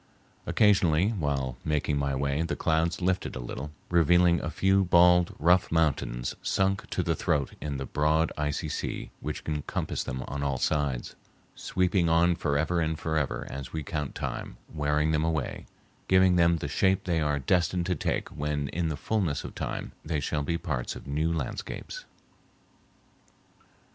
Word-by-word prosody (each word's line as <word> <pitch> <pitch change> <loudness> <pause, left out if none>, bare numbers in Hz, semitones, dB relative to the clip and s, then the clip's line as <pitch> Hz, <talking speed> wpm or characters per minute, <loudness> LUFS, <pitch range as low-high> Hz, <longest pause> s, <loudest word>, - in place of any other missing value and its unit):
Occasionally, 95 -4 +4
while 70 - -2
making 75 -1 0
my 70 -1 0
way, 70 +2 0
the 85 - -1
clouds 80 +2 0
lifted 95 0 0
a - - -4
little, 65 +4 -5 0.2
revealing 85 +1 +4
a - - -3
few 95 0 +3
bald, 90 -1 +5
rough 90 +3 +3
mountains 75 -7 0
sunk 95 0 0
to - - -1
the - - +1
throat 70 -2 0
in 70 -1 -3
the 70 - -4
broad, 75 +3 +1
icy 75 +2 -2
sea 75 - -4
which - - -5
encompassed 75 -2 -3
them 65 0 -3
on 70 +1 -4
all 70 -2 0
sides, 70 -2 -1 0.4
sweeping 90 -2 +1
on 85 +1 +4
forever 80 +3 0
and 80 0 -1
forever 80 -3 -1
as 70 -1 -7
we 80 -1 -3
count 75 -1 -4
time, - - -5 0.2
wearing 75 0 +1
them 75 0 +1
away, 80 -4 -2 0.4
giving 95 -1 +5
them 85 -1 +4
the - - -4
shape 95 0 +2
they 85 -3 0
are 75 -1 +1
destined 85 +5 +1
to 90 - +1
take - - -2
when 75 -1 -2
in 85 +1 -1
the 75 - -3
fullness 90 -6 -1
of - - -7
time - - -4
they 75 -1 -1
shall 75 +1 -1
be 85 +4 -1
parts 70 -8 -3
of - - -10
new 75 +4 0
landscapes. - - -5
80 Hz, 165 wpm, -28 LUFS, 70-85 Hz, 0.4 s, bald